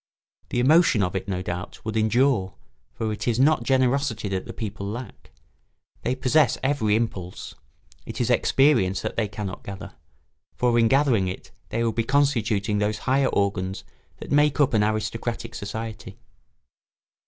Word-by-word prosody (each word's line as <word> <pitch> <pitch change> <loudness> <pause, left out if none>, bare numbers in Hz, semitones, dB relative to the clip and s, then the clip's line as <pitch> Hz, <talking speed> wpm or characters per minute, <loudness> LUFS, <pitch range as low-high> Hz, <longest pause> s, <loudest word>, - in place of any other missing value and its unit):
The 120 - -1
emotion 140 - +4
of 90 +1 -2
it, 95 - -3
no 95 -2 -2
doubt, 90 +5 -6
would 110 0 -3
endure, 110 -2 +2 0.4
for 110 -1 -3
it 105 - -5
is 120 0 +1
not 145 0 +4
generosity 130 -2 +1
that 95 -1 -3
the - - -5
people 105 -3 -5
lack. 115 +1 -8 0.7
They 125 - -1
possess 135 +2 +3
every 130 -7 +2
impulse; 100 -6 -3 0.5
it - - -6
is - - +1
experience 135 -10 +3
that - - -3
they 110 - 0
cannot 100 -2 -6
gather, 100 0 -8 0.6
for 120 -1 +2
in 115 - +5
gathering 130 -7 +3
it 90 +1 -7 0.2
they 115 +1 -1
would 115 -1 0
be 115 - 0
constituting 115 -6 +1
those 105 +1 0
higher 135 +1 +3
organs 95 -1 -1 0.3
that - - -9
make 145 0 +3
up 140 -2 +3
an 105 -2 +3
aristocratic 110 +2 -2
society. 110 +2 -6
115 Hz, 155 wpm, -24 LUFS, 100-130 Hz, 0.7 s, in